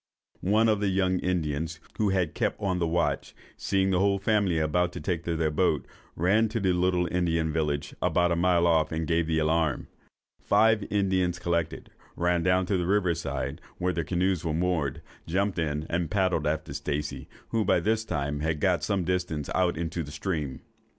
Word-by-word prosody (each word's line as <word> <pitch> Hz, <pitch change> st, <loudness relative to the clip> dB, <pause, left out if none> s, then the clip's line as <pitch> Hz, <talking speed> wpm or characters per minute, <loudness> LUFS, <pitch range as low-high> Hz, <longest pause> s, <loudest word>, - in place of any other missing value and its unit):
One 110 Hz, +2 st, +4 dB
of 105 Hz, -2 st, +2 dB
the 105 Hz, -, 0 dB
young 95 Hz, -1 st, +1 dB
Indians, 80 Hz, -2 st, -2 dB, 0.2 s
who 105 Hz, -2 st, +3 dB
had 90 Hz, -5 st, 0 dB
kept -, -, -1 dB
on 95 Hz, -3 st, -1 dB
the 85 Hz, -, +1 dB
watch, 85 Hz, 0 st, -1 dB, 0.2 s
seeing 95 Hz, -1 st, 0 dB
the 90 Hz, -, +2 dB
whole 100 Hz, 0 st, +3 dB
family 100 Hz, -3 st, +1 dB
about 85 Hz, +3 st, +1 dB
to -, -, -5 dB
take 85 Hz, -3 st, -2 dB
their 80 Hz, -2 st, 0 dB
boat, 75 Hz, -, +1 dB, 0.3 s
ran 105 Hz, +7 st, +3 dB
to 115 Hz, +2 st, -2 dB
the 95 Hz, -3 st, +2 dB
little 90 Hz, 0 st, +1 dB
Indian 85 Hz, -3 st, 0 dB
village, 75 Hz, -2 st, -1 dB
about 90 Hz, 0 st, +2 dB
a -, -, +2 dB
mile 85 Hz, 0 st, +3 dB
off, 80 Hz, -2 st, +3 dB
and 80 Hz, 0 st, -2 dB
gave 80 Hz, 0 st, +1 dB
the 80 Hz, -1 st, +1 dB
alarm. 80 Hz, -2 st, +1 dB, 0.5 s
Five 110 Hz, -2 st, +3 dB
Indians 95 Hz, -3 st, +1 dB
collected, 85 Hz, -2 st, -2 dB, 0.2 s
ran 85 Hz, 0 st, +1 dB
down 90 Hz, +1 st, +2 dB
to 95 Hz, +1 st, 0 dB
the 90 Hz, -1 st, -1 dB
river 95 Hz, -3 st, +2 dB
side, 70 Hz, -4 st, -4 dB, 0.2 s
where 90 Hz, +1 st, 0 dB
their 85 Hz, -, -1 dB
canoes 90 Hz, 0 st, 0 dB
were 80 Hz, -2 st, -1 dB
moored, 80 Hz, -6 st, -1 dB, 0.2 s
jumped 95 Hz, +2 st, 0 dB
in, 75 Hz, -1 st, -1 dB
and 85 Hz, -1 st, -1 dB
paddled 90 Hz, -5 st, +1 dB
after 75 Hz, -2 st, -2 dB
Stacey, 75 Hz, +1 st, -4 dB, 0.2 s
who 115 Hz, -1 st, +1 dB
by -, -, +3 dB
this 110 Hz, 0 st, 0 dB
time 75 Hz, -7 st, -2 dB
had 80 Hz, 0 st, -1 dB
got -, -, +1 dB
some 100 Hz, -3 st, 0 dB
distance 85 Hz, -5 st, -2 dB
out 90 Hz, -3 st, +1 dB
into 85 Hz, 0 st, -3 dB
the 75 Hz, -, -6 dB
stream. 75 Hz, -3 st, -3 dB
85 Hz, 190 wpm, -27 LUFS, 80-95 Hz, 0.5 s, One